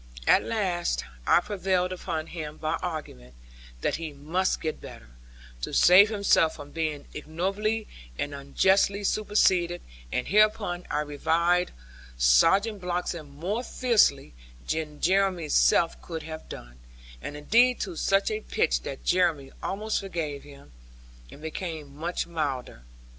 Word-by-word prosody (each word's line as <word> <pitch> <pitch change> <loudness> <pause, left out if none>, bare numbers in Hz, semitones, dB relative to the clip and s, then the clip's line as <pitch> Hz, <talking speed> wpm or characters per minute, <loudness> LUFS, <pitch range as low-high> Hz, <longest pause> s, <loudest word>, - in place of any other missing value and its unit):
At - - +5
last 175 - -1 0.2
I - - +5
prevailed 185 -2 -1
upon 165 -3 -4
him 155 -3 -7
by 155 - -2
argument, 105 - -6 0.5
that - - 0
he 160 -1 -5
must 165 +7 -1
get 155 -1 -4
better, - - -11 0.5
to - - -4
save 195 +4 +7
himself 200 -6 +3
from 145 0 -10
being 155 -3 -3
ignobly 195 +8 -2 0.3
and 145 - -3
unjustly 190 +8 +2
superseded; 185 -4 +2 0.3
and 125 - -2
hereupon 210 -3 +2
I 150 - 0
reviled 165 +4 +1 0.5
Sergeant 195 - +4
Bloxham 175 -3 -3
more 180 - -3
fiercely 215 - +2 0.3
than 155 -2 -3
Jeremy's 185 -4 +1
self 165 - +3
could 165 -2 -6
have 160 0 -8
done, - - -10 0.4
and 145 - -6
indeed 240 +11 +3
to 185 -4 -4
such 195 - +1
a 430 0 -2
pitch - - 0
that - - -7
Jeremy 170 -7 +1
almost 210 +3 -2
forgave 165 -7 -4
him, 140 -1 -15 0.6
and 150 - -13
became 160 -3 -6
much 170 +4 -3
milder. 140 - -4
170 Hz, 130 wpm, -27 LUFS, 150-195 Hz, 0.6 s, save